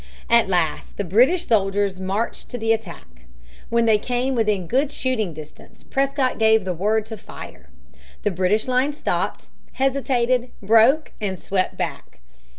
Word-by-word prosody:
At 235 -4 +5
last 175 -4 -1
the 205 - -1
British 250 - +3
soldiers 200 -3 +1
marched 195 +5 -3
to 245 - -5
the 225 -1 +2
attack. 225 0 -8 0.4
When 235 0 +2
they 220 -2 +4
came 250 +3 -1
within 210 -6 0
good 270 - +1
shooting 245 -10 -1
distance, 155 -1 -13
Prescott 275 -2 0
gave 220 -2 +4
the 185 - -1
word 210 +5 0
to 220 0 -7
fire. 65 - -11 0.5
The 210 - +1
British 190 +5 +1
line 255 +3 +1
stopped, 295 - -3 0.2
hesitated, 255 -2 +1
broke, 230 +9 +4
and 190 -3 -2
swept 190 -1 -1
back. - - -5
220 Hz, 150 wpm, -22 LUFS, 195-255 Hz, 0.5 s, At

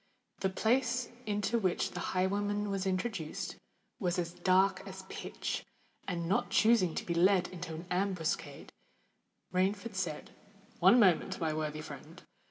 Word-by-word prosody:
The 190 - +1
place 245 +5 +1 0.2
into 210 +3 +1
which 185 -5 0
the - - -5
highwayman 205 +2 0
was 195 -1 -1
introduced, 185 -4 -2 0.4
was 180 -4 0
as 170 -1 -2
dark 185 +1 +3
as 190 0 -8
pitch; - - -4 0.4
and, 170 -3 -2
not 195 - +1
choosing 215 -7 +4
to - - -3
be 170 - -1
led 185 +2 +4
into 180 -3 -6
an 165 +3 -7
ambuscade, 180 -3 -2 0.8
Rainford 200 +4 0
said, 175 -5 -3 0.5
"One 190 +7 +7
moment, 190 -2 +3
my 160 -3 0
worthy 155 0 -3
friend! 150 +4 -10
185 Hz, 140 wpm, -32 LUFS, 175-200 Hz, 0.8 s, One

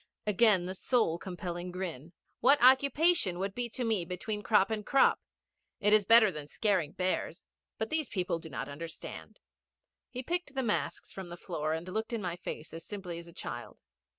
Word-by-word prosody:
Again 210 -3 +4
that 185 +1 -4
soul 220 -10 +1
compelling 175 -1 -5
grin. 175 -4 -6 0.3
'What 275 +5 +6
occupation 265 - +4
would 195 +1 -2
be 245 +1 -3
to 250 - -4
me 220 -6 +1
between 190 +5 -4
crop 210 -1 +3
and 215 -1 -2
crop? 275 +5 +4 0.6
It 210 0 +4
is 215 -2 +5
better 230 -3 +7
than 150 -3 -7
scaring 185 -4 0
bears. 185 -1 -2 0.3
But 220 - -3
these 315 -5 0
people 180 -4 -1
do 160 - -9
not - - -4
understand.' 155 +3 -8 0.7
He 255 0 -5
picked 345 -1 -3
the 265 - 0
masks 215 -3 -2
from 190 -2 -7
the 175 0 -8
floor, 155 -3 -2
and 165 +2 -4
looked 220 +5 -3
in 230 - -1
my 175 -2 -2
face 165 -3 -7
as 165 0 -7
simply 180 -3 -6
as 170 - -11
a - - -12
child. - - -7
190 Hz, 185 wpm, -31 LUFS, 175-230 Hz, 0.7 s, better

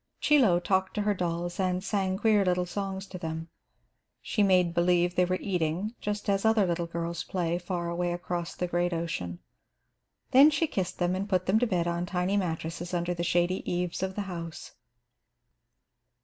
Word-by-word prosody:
Chie 300 0 +4
Lo 185 -9 +4
talked 190 +1 0
to 210 - 0
her 210 0 +2
dolls 175 -1 -3
and 185 -1 0
sang 195 -2 0
queer 210 -1 +3
little 180 -1 +1
songs 195 +1 -4
to 185 -2 -8
them. 160 -1 -5 0.7
She 215 - -1
"made 180 -3 +4
believe" 175 0 +2
they 180 0 +3
were 185 +1 0
eating, 180 +3 -1
just 210 0 -3
as 195 -1 +1
other 220 -2 +4
little 170 -1 -1
girls 170 0 -3
play, 175 -2 -1
far 175 -1 -3
away 175 +1 -1
across 175 -1 -4
the 180 - -1
great 175 0 0
ocean. 165 - -3 0.9
Then 275 +4 +8
she 310 +2 +1
kissed 190 - -3
them 175 0 +1
and 195 +2 -3
put 185 -2 +1
them 200 +4 +3
to 245 - +2
bed 180 -5 0
on 170 +1 -1
tiny 180 +2 0
mattresses 170 -1 -2
under 175 0 0
the 170 - -4
shady 175 +1 +1
eaves 175 0 -2
of 190 0 -2
the 205 - -2
house. 170 -4 -7
180 Hz, 185 wpm, -28 LUFS, 175-195 Hz, 0.9 s, Then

